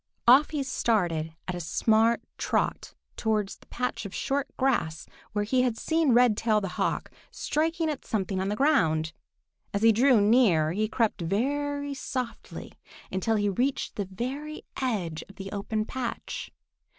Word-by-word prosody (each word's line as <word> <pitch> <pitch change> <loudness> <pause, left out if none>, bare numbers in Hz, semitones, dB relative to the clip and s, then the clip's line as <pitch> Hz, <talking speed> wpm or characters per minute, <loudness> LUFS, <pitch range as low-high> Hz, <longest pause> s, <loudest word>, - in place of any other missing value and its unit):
Off 265 +5 +7
he 295 -3 -2
started 175 -11 0
at 185 - -2
a 175 - -4
smart 220 +8 +2 0.2
trot - - -1 0.2
towards 215 -3 0
the - - -22
patch 250 0 -3
of 200 - -7
short 280 +1 -1
grass 205 - 0 0.3
where 205 -1 +1
he 250 +4 +2
had 245 -3 0
seen 320 -1 +2
Redtail 230 -2 +4
the 195 -2 -4
Hawk - - -2 0.2
striking 325 +2 -1
at 300 -3 -3
something 195 -3 -2
on 190 - -1
the 205 - -1
ground. 160 - +2 0.6
As 200 - 0
he 225 - +8
drew 245 +2 +5
near, 205 -8 +4
he 215 +5 0
crept 225 -3 0
very 285 - -1
softly 255 -3 -5 0.4
until 190 +4 0
he 205 -1 +1
reached 250 +8 -1
the 205 - -2
very 275 +9 -5 0.2
edge 190 -11 -2
of 195 - -14
the 195 0 -7
open 215 +1 -2
patch. 245 0 -5
225 Hz, 155 wpm, -27 LUFS, 195-265 Hz, 0.6 s, he